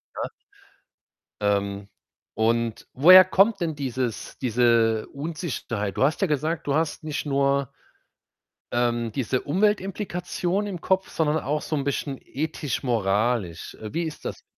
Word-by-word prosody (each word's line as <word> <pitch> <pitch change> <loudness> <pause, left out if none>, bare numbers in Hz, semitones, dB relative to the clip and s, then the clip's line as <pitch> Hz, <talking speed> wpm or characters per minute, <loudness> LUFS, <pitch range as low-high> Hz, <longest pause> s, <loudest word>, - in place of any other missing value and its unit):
ja? - - -4 1.1
Ähm, 100 -1 0 0.5
und 115 0 0
woher 185 +7 +9
kommt 195 +3 +3
denn 160 -3 -1
dieses 130 -4 -3
diese 115 -2 +2
Unsicherheit? 140 - -4
Du - - +2
hast 150 +8 +1
ja 195 - +3
gesagt, 155 +1 -1
du 140 - +1
hast 160 0 -1
nicht 155 -1 -3
nur 140 -1 +1 1.0
ähm, 120 -1 0
diese 130 +1 -1
Umweltimplikation 190 +1 -1
im 185 -4 -5
Kopf, 190 0 +1
sondern 155 -1 +1
auch 150 +1 -2
so 155 - -2
'n 140 - -1
bisschen 140 0 -2
ethisch-moralisch. 120 - -1
Äh, 110 -1 -9
wie 170 - +1
ist 160 -2 -6
das, - - -5
140 Hz, 130 wpm, -25 LUFS, 115-165 Hz, 1.1 s, woher